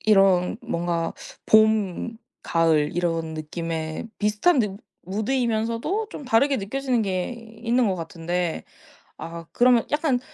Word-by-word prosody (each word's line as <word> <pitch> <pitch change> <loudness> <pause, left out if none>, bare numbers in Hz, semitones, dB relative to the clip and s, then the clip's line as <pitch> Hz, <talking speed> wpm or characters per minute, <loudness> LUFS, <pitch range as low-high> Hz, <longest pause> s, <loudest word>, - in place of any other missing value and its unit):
이런 195 -2 +4
뭔가 170 -7 -1 0.3
봄 220 0 +3 0.3
가을 160 -3 +2
이런 165 -2 -1
느낌에 160 +2 -4
비슷한 210 +10 +3
느 210 -5 0 0.3
무드이면서도 230 - -1
좀 290 - -8
다르게 270 +3 +3
느껴지는 250 +4 -1
게 185 -1 -1 0.3
있는 240 +1 +2
것 195 - +1
같은데, 170 0 -3 0.5
아 165 0 -7
그러면 245 -2 +4
약간 295 -4 +2
205 Hz, 250 characters per minute, -24 LUFS, 170-240 Hz, 0.5 s, 이런